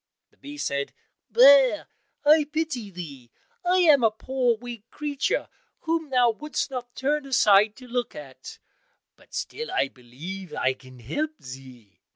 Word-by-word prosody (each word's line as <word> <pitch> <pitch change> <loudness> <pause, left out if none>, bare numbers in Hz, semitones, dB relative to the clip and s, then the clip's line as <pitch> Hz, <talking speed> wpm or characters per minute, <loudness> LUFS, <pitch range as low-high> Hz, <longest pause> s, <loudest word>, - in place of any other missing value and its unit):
The - - -32
bee 290 +1 -10
said, 140 - -2 0.4
"Bear - - +6 0.4
I 305 0 +6
pity 310 -9 -2
thee, 145 -10 -9 0.3
I 365 +1 +3
am 300 -7 +6
a 225 - +6
poor 245 +2 0
weak 235 -1 -9
creature 290 -2 -2 0.3
whom 325 -2 -1
thou 250 -2 +4
wouldst 295 +4 -4
not 245 -2 -6
turn 290 +1 -1
aside 210 -4 +5
to 255 - -13
look 245 0 -3
at, 130 -3 -10 0.6
but - - -16
still, 465 +1 -4
I 135 - +1
believe, 155 +11 -9
I 130 - +1
can 130 -1 -16
help 305 - -3
thee." 130 -5 -12
245 Hz, 150 wpm, -25 LUFS, -, 0.6 s, Bear